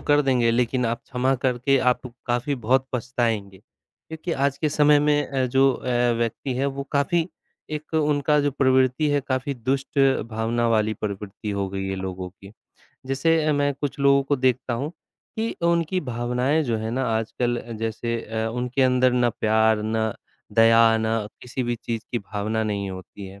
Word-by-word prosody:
कर 145 0 +3
देंगे, 125 -4 +2
लेकिन 125 +2 +1
आप 115 +1 -2
क्षमा 130 +2 0
करके 130 +2 +2 0.2
आप 130 - -10 0.2
काफ़ी 125 +4 0
बहुत 130 +2 +1
पछताएँगे 115 -5 -2
क्योंकि 160 - -9
आज 140 -1 0
के 155 - +1
समय 150 0 +4
में 145 0 +2
अ, 135 -2 0
जो 135 +2 +4
अ, - - -8 0.3
व्यक्ति 120 +3 -2
हैं 135 - 0
वो 140 0 -3
काफ़ी 160 +4 +1 0.4
एक 155 +1 -6
उनका 150 -1 +2
जो 145 0 +1
प्रवृत्ति 130 +2 +2
है, 145 0 +2
काफ़ी 130 +1 -2
दुष्ट 135 +3 -2 0.3
भावना 115 +2 0
वाली 110 -1 +2
प्रवृत्ति 105 0 -5
हो 100 -1 -2
गई 95 0 -4
है 95 - -2
लोगों 95 -1 -5
की, 100 +1 -15 0.5
जैसे 160 +4 +2
अ, 155 - +2
मैं 145 0 +1
कुछ 140 0 -4
लोगों 140 0 +5
को 140 +1 0
देखता 130 -1 0
हूँ 140 +6 -3 0.5
कि 225 +1 -1 0.2
उनकी 170 +1 +1
भावनाएँ 125 +3 0
जो 120 -4 0
हैं 110 +1 -3
ना 130 +3 -1
आजकल 120 +2 -1 0.2
जैसे 115 +1 -2
अ, 110 0 -2
उनके 125 +3 -1
अंदर 125 -1 +3
ना 120 -1 +2
प्यार, 110 0 +2
ना 110 0 -1 0.4
दया, 115 0 +6
ना 110 -1 -1 0.2
किसी 125 +1 -4
भी 120 0 -1
चीज़ 115 -1 -4
की 120 - +1
भावना 105 +2 -3
नहीं 100 -2 -2
होती 95 +1 -9
है। 95 +1 -12
125 Hz, 175 wpm, -24 LUFS, 110-140 Hz, 0.5 s, दया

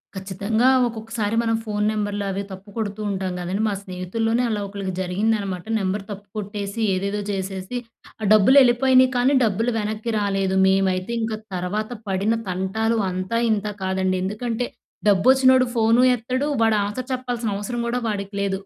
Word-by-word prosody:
ఖచ్చితంగా! 200 +6 +1 0.2
ఒక్కొక్కసారి 225 -1 -3
మనం 225 -1 +1
ఫోన్ 210 -1 -1
నెంబర్లవి 205 -2 -2
తప్పుకొడుతూ 205 +2 -5
ఉంటాం 190 -2 -2
కదండీ! 185 +4 -2
మా 210 - 0
స్నేహితుల్లోనే, 225 +6 -1
అలా 210 -2 -1
ఒకళ్ళకి 195 -2 -5
జరిగిందనమాట. 195 0 -1
నెంబర్ 195 +1 -1
తప్పుకొట్టేసి, 205 +1 -6
ఏదేదో 200 +2 -1
చేసేసి, 190 +3 -4 0.4
ఆ - - -4
డబ్బులు 215 +6 +6
వెళ్ళిపోయినయి 255 +1 +5
కానీ, 255 +3 +3
డబ్బులు 225 +3 +1
వెనక్కి 215 +2 -3
రాలేదు. 195 -2 0
మేమైతే 190 +1 +1
ఇంక, 225 0 -2 0.2
తర్వాత 200 +5 -2 0.2
పడిన 195 +3 +1 0.2
తంటాలు 205 +5 0
అంతా, 185 +5 -2
ఇంతా 210 -1 0
కాదండి. 190 0 0
ఎందుకంటే, 230 +4 -2 0.4
డబ్బు 195 -1 +3
వచ్చినోడు 260 -1 +5
ఫోను 230 +1 +4
ఎత్తడు. 255 +4 -2 0.2
వాడు 225 -1 +3
ఆన్సర్ 250 +6 -5
చెప్పాల్సిన 245 -3 -2
అవసరం 240 +4 -4
కూడా, 245 +1 0
వాడికి 200 -1 -4
లేదు. 195 -1 0
210 Hz, 140 wpm, -23 LUFS, 190-230 Hz, 0.4 s, డబ్బులు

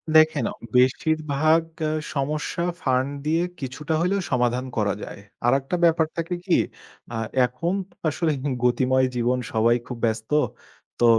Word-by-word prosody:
দেখেন, 155 -5 +5
অ - - -13 0.2
বেশিরভাগ 155 +4 +3 0.5
সমস্যা, 150 +4 -2 0.2
ফান্ড 130 0 +1 0.2
দিয়ে 160 +2 +2 0.2
কিছুটা 150 +4 -4
হইলেও 195 +3 +1
সমাধান 125 0 +1
করা 105 -2 +2
যায়। - - -8 0.3
আরেকটা 135 +6 +2
ব্যাপার 165 -1 +5
থাকে 165 +1 -2
কি? 180 - +4 0.5
অ্যা 115 - -4 0.3
এখন 125 +9 -2 0.2
তো - - -25 0.2
আসলে 160 +2 0 0.3
গতিময় 130 +1 +3
জীবন 125 +1 +1
সবাই 115 +1 +4
খুব 125 - -5
ব্যস্ত। 110 +1 -2 0.7
তো 120 - +4
135 Hz, 135 wpm, -24 LUFS, 125-160 Hz, 0.7 s, দেখেন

